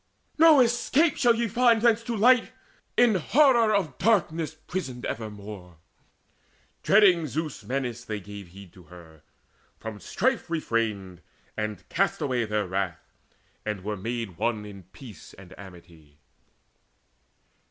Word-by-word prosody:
No 315 -4 +7
escape 255 +6 +2
shall 240 -3 +3
ye 235 0 -1
find 235 +1 +3
thence 230 -1 +4
to 235 -1 -3
light, 245 +3 +4 0.5
In 240 -2 +5
horror 235 - +3
of 180 -11 -1
darkness 165 -7 +1
prisoned 155 -7 -6
evermore." 105 -5 -7 1.0
Dreading 190 -6 +4
Zeus' 155 +1 -5
menace 125 -2 -4
gave 110 -3 -4
they 100 0 -9
heed 95 -1 -14
to 90 -3 -17
her, 80 -2 -15 0.6
From 110 -2 -8
strife 260 - -1
refrained, 110 - -2 0.3
and 105 -4 -5
cast - - 0
away 125 -4 -1
their 105 -1 -1
wrath, 95 -2 -4 0.5
And 105 -3 -4
were 105 +1 -3
made 110 -3 -5
one 110 -3 -1
in 100 -3 -11
peace 120 -8 -13
and 95 -1 -14
amity. 85 -6 -15
120 Hz, 130 wpm, -26 LUFS, -, 1.0 s, No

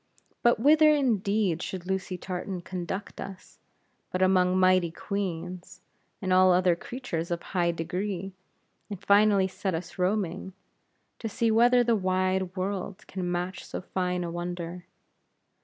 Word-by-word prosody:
But 240 -2 +4
whither 305 +5 +6
indeed 210 - +1
should 180 -1 -5
Lucy 190 -1 -2
Tartan 185 0 -5
conduct 185 +2 -5
us, 195 -2 -10 0.5
but 185 0 +1
among 185 -1 +3
mighty 185 -2 +4
Queens, 180 -1 -5 0.4
and 185 -1 +1
all 185 0 +6
other 180 -1 +4
creatures 170 -5 -5
of 170 -1 -3
high 175 -3 0
degree; 185 +3 -3 0.6
and 200 -3 -6
finally 200 -1 +4
set 190 -1 -3
us 170 +3 -7
roaming, 190 -1 -1 0.7
to 225 - -4
see 225 +2 +1
whether 245 +2 +5
the 235 -1 +2
wide 185 -1 0
world 190 0 -4
can 180 -2 -4
match 180 +1 -3
so - - -6
fine 180 -1 -2
a 170 - -4
wonder. 175 0 -5
185 Hz, 140 wpm, -27 LUFS, 180-200 Hz, 0.7 s, whither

